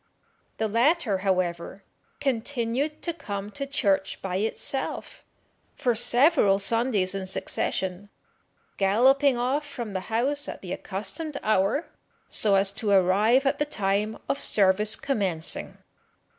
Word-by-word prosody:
The 220 - 0
latter, 235 - +2
however, 185 -1 -2 0.4
continued 265 +2 -2
to 340 - -2
come 205 -9 -6
to 275 +5 -5
church 200 -9 0
by 185 -1 -3
itself 225 +6 -3 0.5
for 245 - +1
several 245 - +4
Sundays 210 -2 +1
in 195 -1 -4
succession, 190 +1 -2 0.7
galloping 255 +7 +4
off 260 +5 0
from 245 -7 -7
the 190 - -1
house 270 +6 0
at - - -7
the 180 - -4
accustomed 280 - -5
hour, 215 - +1 0.4
so 205 -2 +2
as 195 0 +3
to 210 +1 -3
arrive 200 +7 +4
at 270 - +1
the 295 - +2
time 210 -4 -1
of 280 - -1
service 205 +1 +3
commencing. 190 - -2
220 Hz, 125 wpm, -26 LUFS, 195-270 Hz, 0.7 s, several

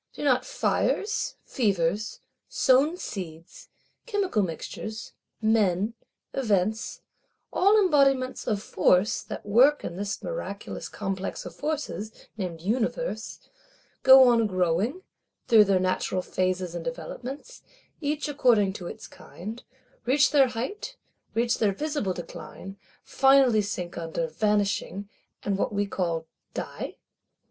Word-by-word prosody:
Do - - -7
not 260 -3 +2
fires, 430 +2 0
fevers, 205 -2 0 0.3
sown 280 +6 +3
seeds, 170 - -8 0.4
chemical 400 - +1
mixtures, 205 +5 -5 0.3
men, 215 -1 +2 0.4
events; 215 -3 0 0.5
all 400 +3 +5
embodiments 275 -9 +3
of 210 -3 0
Force 185 +2 +2
that - - -8
work 250 +8 +5
in 170 - -5
this 200 +1 -3
miraculous - - -5
Complex 195 -2 -4
of - - -8
Forces, 295 -7 -3 0.2
named 180 -6 -5
Universe,—go 265 - +2
on 230 -2 +4
growing, 185 - 0 0.4
through 220 -3 +7
their 195 -2 +3
natural 185 0 0
phases 185 -1 -1
and 170 -1 -5
developments, 260 - -7 0.4
each 300 0 -1
according 240 -9 +3
to 180 -2 -7
its - - -8
kind; 220 +6 -9 0.4
reach 270 +3 +4
their 280 -3 +6
height, 260 - -5 0.4
reach 235 +1 +1
their 205 -3 +2
visible 290 -6 -2
decline; 185 +2 -8 0.3
finally 270 -5 +5
sink 180 -4 -4
under, 165 0 -2
vanishing, 200 +2 0 0.4
and 200 -1 -1
what - - 0
we 205 0 0
call 170 -5 -2 0.3
_die? - - -5
215 Hz, 115 wpm, -27 LUFS, 190-270 Hz, 0.5 s, through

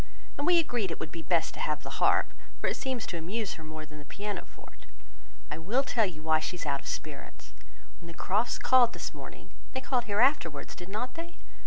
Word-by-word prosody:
And 285 - -1
we 355 -1 +7
agreed 245 - +2
it 165 - -4
would 160 - -4
be 165 - -5
best 165 +1 +2
to - - -8
have 150 -1 0
the - - -5
harp, - - +4 0.3
for - - -2
it - - +2
seems 260 -4 -2
to 170 - -3
amuse 200 +6 -2
her 160 - -9
more 155 0 -6
than 155 0 -11
the - - -9
piano 205 +4 -4
forte. - - -16 0.6
I 150 - -3
will 225 +12 +2
tell 230 -5 +3
you 155 -4 -8
why 160 0 +4
she 155 - -2
is 175 - -5
out 140 -1 +1
of - - -11
spirits. 150 -3 -6 0.5
When 170 - -11
the 170 - -10
Crofts 210 +5 +1
called 250 -2 +6
this - - -4
morning, - - -10 0.2
(they 260 - -2
called 250 -2 +1
here 205 -2 0
afterwards, 235 - +3
did 175 +1 -9
not 220 +5 -2
they?) 335 +1 -7
190 Hz, 230 wpm, -30 LUFS, 160-245 Hz, 0.6 s, we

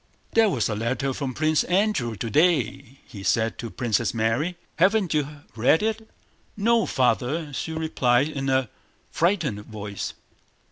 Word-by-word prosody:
"There 225 -1 +5
was 125 - 0
a 110 - -2
letter 125 +5 -1
from 130 -2 -4
Prince 155 0 +2
Andrew 180 - +1
today," 130 - +1
he 105 -5 -10
said 110 +4 0
to 115 - -5
Princess 115 -1 -1
Mary—"Haven't 170 - +1
you 150 -1 -2
read 130 - +3
it?" 220 0 -2 0.5
"No, 230 +2 +3
Father," 140 +4 0
she 160 +4 -3
replied 140 -5 +2
in 140 -3 -3
a 130 -3 +1 0.4
frightened 160 - 0
voice. 105 -2 -6
135 Hz, 135 wpm, -25 LUFS, 115-170 Hz, 0.5 s, There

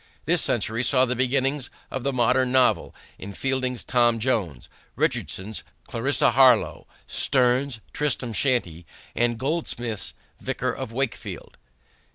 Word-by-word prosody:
This - - +3
century 115 +2 0
saw 130 0 +4
the 125 0 -2
beginnings 130 +2 0 0.2
of 130 - -4
the 140 - 0
modern 125 0 +2
novel, 130 -1 +2 0.2
in 100 +1 -8
Fielding's 130 0 -2
Tom 120 -2 +2
Jones, 105 - -1 0.3
Richardson's 100 +3 -1 0.2
Clarissa 130 +2 +2
Harlowe, 130 +1 +4 0.2
Sterne's 125 -1 +1
Tristram 130 -5 0
Shandy, 95 - 0 0.3
and 120 -1 +1
Goldsmith's 120 - -3 0.2
Vicar - - -2
of - - -6
Wakefield. 130 0 -4
125 Hz, 120 wpm, -24 LUFS, 115-130 Hz, 0.3 s, saw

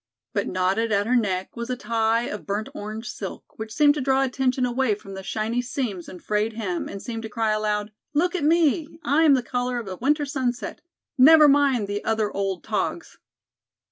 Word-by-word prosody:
But - - 0
knotted 190 +5 0
at 200 0 +2
her 250 +3 +2
neck 190 -6 -1
was 235 +1 -5
a 250 - 0
tie 225 0 +1
of 210 -3 -6
burnt 205 +2 -2
orange 215 +2 -6
silk 200 0 -8
which 220 0 -5
seemed 290 +5 +5
to 295 - -3
draw 265 +1 +2
attention 255 -1 0
away 245 -3 +1
from 195 -1 -11
the 190 - -6
shiny 220 +5 -2
seams 245 -8 -4
and 180 - -10
frayed 210 +1 0
hem 200 -6 -3
and 200 - -6
to 225 -1 -6
cry 220 0 0
aloud: 210 0 -1 0.2
"Look 350 +4 +2
at 365 - -2
me. 320 0 +3 0.2
I 310 +4 +3
am 285 -3 +7
the 255 - 0
color 245 0 -2
of 235 -4 -5
a 185 -1 -6
winter 290 - +1
sunset. 260 -4 -3 0.4
Never 305 +3 +8
mind 275 -6 +3
the 205 +1 -3
other 220 -2 0
old 195 -2 -2
togs." - - -3
230 Hz, 200 wpm, -24 LUFS, 210-265 Hz, 0.4 s, Never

